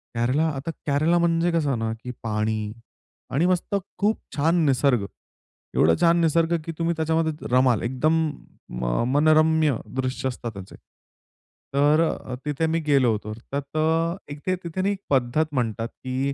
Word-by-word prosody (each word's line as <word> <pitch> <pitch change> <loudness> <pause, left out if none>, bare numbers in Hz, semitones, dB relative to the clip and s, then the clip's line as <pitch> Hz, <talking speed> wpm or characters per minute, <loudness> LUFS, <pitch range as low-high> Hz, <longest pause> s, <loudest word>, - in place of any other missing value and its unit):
केरला, 130 +7 +1
आता 145 +5 -4 0.2
केरला 155 +5 +3
म्हणजे 170 0 +2
कसं 145 -7 +1
ना, 110 0 -1
की 125 - -5
पाणी 110 -1 -1 0.6
आणि 155 +6 +2
मस्त 185 +2 0 0.2
खूप 210 +2 +1 0.2
छान 160 +4 +2
निसर्ग, 130 -5 +2 0.7
एवढं 80 +1 +4
छान 170 0 +5
निसर्ग, 165 +1 +2
की 165 - -3
तुम्ही 165 +1 +1
त्याच्यामध्ये 160 -1 -1
रमाल 130 -3 +4
एकदम 130 +6 +1 0.6
म - - -4
अ, - - +1
मनरम्य 155 -1 +3 0.2
दृश्य 130 0 -1
असतात 120 -2 -6
त्याचे. 95 -1 -10 1.0
तर 145 +3 +4
अ, 130 -5 -2
तिथे 150 +2 0
मी 165 +1 +1
गेलो 135 -5 +4
होतो. 105 0 -3 0.2
तर 140 - +1 0.2
त - - 0 0.5
एक 145 - -7
ते 185 - +2
तिथे 170 +2 -3
ना, 200 +1 +1 0.2
पद्धत 135 +3 +2
म्हणतात, 115 -3 -1
की 130 +2 -3
145 Hz, 155 wpm, -24 LUFS, 120-165 Hz, 1.0 s, छान